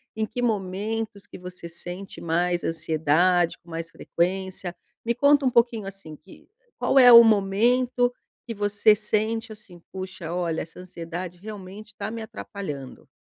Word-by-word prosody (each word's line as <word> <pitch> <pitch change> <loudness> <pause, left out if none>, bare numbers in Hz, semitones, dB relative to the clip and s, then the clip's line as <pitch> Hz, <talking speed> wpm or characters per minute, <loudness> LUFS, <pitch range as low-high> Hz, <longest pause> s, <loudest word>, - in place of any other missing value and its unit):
em 220 0 0
que 235 +3 -5
momentos 215 0 -2
que - - -11
você 180 -1 -9
sente 180 +3 -6
mais 175 +1 0
ansiedade, 165 +2 +2
com 170 - -21
mais 165 0 -5
frequência. 185 +1 -2 0.3
Me 235 - +1
conta 285 +2 +4
um - - +4
pouquinho, 230 -4 +2
assim, 195 -5 -9
que 155 +5 -18 0.3
qual - - +1
é 250 -1 +9
o 235 0 +12
momento 240 +4 +2 0.3
que 230 - -4
você 205 +1 +3
sente, 220 +2 -1
assim: 210 -5 -13
"Puxa, 185 -3 -6
olha, 170 -2 -1
essa 165 - -10
ansiedade, 175 0 -7
realmente, 205 +1 -10
tá 200 0 -4
me 230 0 -6
atrapalhando". 170 -11 -8
195 Hz, 150 wpm, -25 LUFS, 175-220 Hz, 0.3 s, o